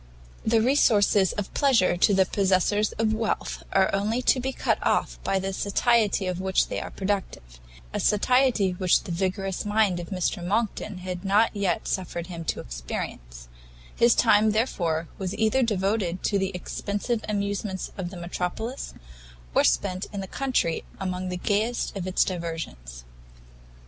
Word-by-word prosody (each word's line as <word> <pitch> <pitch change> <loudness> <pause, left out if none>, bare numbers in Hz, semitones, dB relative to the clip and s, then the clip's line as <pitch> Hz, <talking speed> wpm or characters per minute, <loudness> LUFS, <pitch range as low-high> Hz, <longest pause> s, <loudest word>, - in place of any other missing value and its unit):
The 225 0 +3
resources 210 -7 +4
of 205 -2 -5
pleasure 255 -12 +3
to 190 +3 +3
the 190 0 +4
possessors 200 +2 +2
of 220 0 0
wealth 220 0 -2
are 190 -1 +3
only 215 +5 0
to 255 - +4
be 265 +2 -2
cut - - 0
off - - 0
by 195 - +1
the 190 0 -2
satiety 205 +1 +2
of 185 0 -2
which 190 0 +1
they - - -2
are - - -6
productive: 190 - -4 0.3
a - - -1
satiety 235 -2 +3
which 180 0 +2
the - - -6
vigorous 190 +2 -2
mind 210 -4 +2
of 170 - -7
Mr 180 -2 -2
Monckton 210 0 -1
had 180 -1 -4
not 205 +3 +3
yet 200 -3 -1
suffered 175 -2 -3
him 170 -2 -7
to - - -2
experience; - - -6 0.5
his 235 0 +5
time, 215 -2 +4
therefore, 170 -8 0
was 190 -1 -3
either 220 +4 +2
devoted 195 -4 0
to 200 - +1
the 190 0 0
expensive 205 +5 -3
amusements 200 -2 -2
of 185 -3 -4
the 180 - -9
metropolis, 180 +8 -4 0.6
or - - +4
spent 180 - +1
in 200 - -5
the 195 - -4
country 250 -10 -1 0.2
among 185 -1 -3
the 180 - -3
gayest 215 +6 -1
of 185 -2 -4
its 185 - +3
diversions. 165 - -5
195 Hz, 160 wpm, -26 LUFS, 180-215 Hz, 0.6 s, his